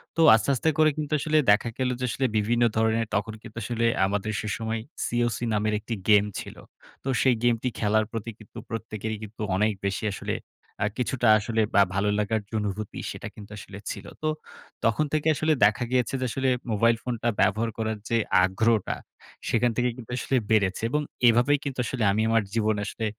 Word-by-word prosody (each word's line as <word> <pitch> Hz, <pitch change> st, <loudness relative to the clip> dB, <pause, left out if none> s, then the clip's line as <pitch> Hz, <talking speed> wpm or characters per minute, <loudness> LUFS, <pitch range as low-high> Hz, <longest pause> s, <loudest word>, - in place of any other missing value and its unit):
তো 165 Hz, -, +2 dB
আস্তে, 110 Hz, -, 0 dB
আস্তে 160 Hz, -, +1 dB
করে 155 Hz, 0 st, +6 dB
কিন্তু 150 Hz, 0 st, -3 dB
আসলে 155 Hz, +2 st, +1 dB
দেখা 105 Hz, +3 st, +3 dB
গেল 130 Hz, -1 st, 0 dB
যে 125 Hz, -, -1 dB
আসলে 130 Hz, +4 st, -1 dB
বিভিন্ন 115 Hz, +3 st, +2 dB
ধরণের 110 Hz, 0 st, +2 dB
তখন 105 Hz, +2 st, -1 dB
কিন্তু -, -, -12 dB
আসলে 115 Hz, +1 st, -1 dB, 0.2 s
আমাদের 100 Hz, +2 st, -1 dB
সেসময় 110 Hz, +1 st, -3 dB, 0.3 s
সিওসি 120 Hz, 0 st, 0 dB
নামের 105 Hz, 0 st, +1 dB
একটি 110 Hz, +2 st, -5 dB, 0.2 s
গেম 105 Hz, -1 st, +6 dB
ছিল। -, -, -8 dB, 0.5 s
তো -, -, -8 dB
সেই 130 Hz, -2 st, +4 dB
গেমটি 120 Hz, 0 st, +2 dB
খেলার 110 Hz, 0 st, +2 dB
প্রতি 115 Hz, 0 st, -4 dB
কিন্তু 110 Hz, +1 st, -14 dB
প্রত্যেকেরই 110 Hz, -1 st, -4 dB
কিন্তু 110 Hz, +1 st, -9 dB
অনেক 105 Hz, +3 st, +2 dB, 0.2 s
বেশি 100 Hz, +2 st, -3 dB
আসলে -, -, -3 dB, 0.5 s
আ -, -, +3 dB
কিছুটা 125 Hz, -1 st, 0 dB
আসলে 110 Hz, +2 st, 0 dB
বা 100 Hz, -, +7 dB
ভালো 100 Hz, +2 st, +1 dB
লাগার 110 Hz, +1 st, 0 dB
যে -, -, -22 dB
অনুভূতি, 105 Hz, 0 st, -4 dB
সেটা -, -, -7 dB
কিন্তু 105 Hz, -1 st, -11 dB
আসলে 95 Hz, 0 st, -9 dB
ছিল। -, -, -7 dB, 0.2 s
তো 155 Hz, -, -1 dB, 0.6 s
তখন 115 Hz, +7 st, +2 dB
থেকে 155 Hz, 0 st, +1 dB
আসলে 155 Hz, +2 st, +2 dB
দেখা 105 Hz, +4 st, +2 dB
গিয়েছে 125 Hz, -1 st, +1 dB
যে -, -, +1 dB
আসলে 130 Hz, +3 st, 0 dB, 0.2 s
মোবাইল 115 Hz, +2 st, +3 dB
ফোনটা 120 Hz, -1 st, -1 dB
ব্যবহার 110 Hz, +3 st, +2 dB
করার 110 Hz, -1 st, -2 dB
যে 115 Hz, -, +2 dB, 0.3 s
আগ্রহটা, 105 Hz, +3 st, +1 dB, 0.5 s
সেখান 120 Hz, +1 st, +2 dB
থেকে 125 Hz, 0 st, +2 dB
কিন্তু 125 Hz, -2 st, -10 dB
আসলে 135 Hz, -, -1 dB, 0.2 s
বেড়েছে 100 Hz, -2 st, +2 dB
এবং 150 Hz, +4 st, +1 dB, 0.3 s
এভাবেই 125 Hz, +5 st, +4 dB
কিন্তু 135 Hz, -3 st, -5 dB
আসলে 120 Hz, 0 st, -2 dB
আমি 105 Hz, +2 st, +1 dB
আমার 115 Hz, -1 st, +3 dB
জীবনে 110 Hz, -2 st, +1 dB
আসলে 110 Hz, +2 st, -4 dB
115 Hz, 185 wpm, -26 LUFS, 105-120 Hz, 0.6 s, বা